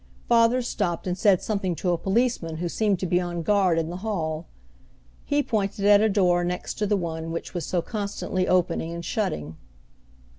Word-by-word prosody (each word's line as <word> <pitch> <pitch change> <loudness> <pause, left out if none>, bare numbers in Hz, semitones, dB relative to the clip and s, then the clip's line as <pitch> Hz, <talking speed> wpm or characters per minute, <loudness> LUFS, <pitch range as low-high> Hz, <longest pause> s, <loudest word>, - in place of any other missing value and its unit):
Father 235 +1 +4
stopped 180 -8 -2
and 180 -1 -1
said 190 -1 +3
something 195 -5 -1
to 180 +2 -1
a 175 - +1
policeman 195 -5 0
who 175 +2 -2
seemed 205 +2 +1
to 185 - -3
be 180 0 +2
on 175 -1 -3
guard 190 -2 +3
in 165 0 -1
the 175 - -5
hall. 170 -6 -3 0.8
He 290 0 +1
pointed 200 -3 -1
at 205 0 +7
a 220 - +3
door 180 -3 +3
next 180 +1 -3
to 210 - +1
the 205 0 +2
one 165 -2 -4
which 165 - -5
was 175 -3 -3
so 175 -2 0
constantly 200 -3 -2
opening 170 -2 +1
and 170 0 -6
shutting. 80 - -2
185 Hz, 190 wpm, -25 LUFS, 170-205 Hz, 0.8 s, at